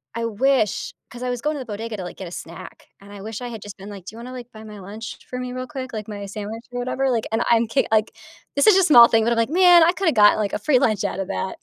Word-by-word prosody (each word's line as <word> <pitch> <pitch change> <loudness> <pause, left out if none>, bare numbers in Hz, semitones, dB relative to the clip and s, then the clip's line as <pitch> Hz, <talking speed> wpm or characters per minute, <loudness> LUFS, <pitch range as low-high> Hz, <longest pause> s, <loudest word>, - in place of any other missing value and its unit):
I 230 0 -2
wish 230 0 0 0.2
'cause 245 0 -10
I 250 - -2
was 245 -1 -3
going 305 0 0
to - - -5
the 260 - -6
bodega 225 0 -6
to, 185 - -5
like, 175 - -8
get 190 - -7
a 170 - -10
snack - - -10
and 200 +1 -14
I 200 - -10
wish 220 +1 -6
I 245 - -5
had 225 -3 -8
just 205 -1 -10
been 195 +2 -10
like, 195 -3 -10
"Do - - -9
you - - -11
wanna, 250 +2 -8
like, 245 -1 -9
buy 215 0 -11
my 210 -2 -10
lunch 210 +4 -8
for 250 - -5
me 250 0 -5
real 255 0 -5
quick? 260 -4 -7
Like, 215 -1 -5
my 205 -1 -6
sandwich 215 +3 -7
or 245 - -3
whatever?" 260 +1 -1
Like, 230 -2 -1
and 225 +1 +1
I'm 230 -1 +3
k 265 +5 +1
like, 220 0 +2 0.4
it's 280 - +3
just 400 -3 +7
a - - +3
small 240 -8 +8
thing, 225 -1 +2
but 235 - +1
I'm 235 - +1
like, 230 +4 +1
"Man, 355 -1 +7
I 340 - +5
could've 365 -7 0
got, 210 -1 +6
like, 210 -2 -2
a - - -1
free 255 +3 +3
lunch 215 -7 +1
out 195 - -3
of 195 - -3
that." 95 - -4
230 Hz, 320 wpm, -22 LUFS, 210-255 Hz, 0.4 s, small